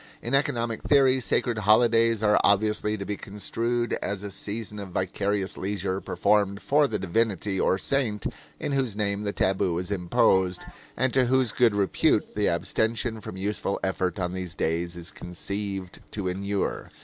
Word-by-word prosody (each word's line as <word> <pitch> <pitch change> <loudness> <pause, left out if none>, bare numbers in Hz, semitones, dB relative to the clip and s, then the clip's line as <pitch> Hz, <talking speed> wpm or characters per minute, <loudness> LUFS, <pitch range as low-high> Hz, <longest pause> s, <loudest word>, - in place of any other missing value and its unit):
In 120 - -5
economic 120 -5 +1
theory, 135 -2 +4
sacred 120 -2 0
holidays 115 +1 +4
are 105 0 +4
obviously 105 +1 +2
to 100 - -5
be 105 - -2
construed 115 +4 -2
as 100 0 -3
a 100 - -6
season 105 +2 -5
of 100 -2 -7
vicarious 95 +2 -1
leisure 95 -1 -2
performed 100 -1 +1
for 145 +1 +3
the - - -2
divinity 100 0 0
or 95 - +2
saint 110 -3 0 0.3
in - - -3
whose 130 -6 0
name 100 -1 0
the 105 -1 -2
tabu 95 -3 +1
is 90 +3 -4
imposed 90 0 +2 0.3
and 130 -1 +1
to 130 -1 +4
whose 130 -2 +2
good 115 -3 +3
repute 100 -1 +1
the 105 -1 +1
abstention 110 +6 0
from 95 - -8
useful 100 0 -2
effort 95 -2 -1
on 90 -1 -2
these 90 -2 -4
days 85 +2 -1
is 85 -1 -4
conceived 95 +1 -5
to 100 -3 -3
inure. 100 +2 -2
100 Hz, 160 wpm, -26 LUFS, 95-115 Hz, 0.3 s, theory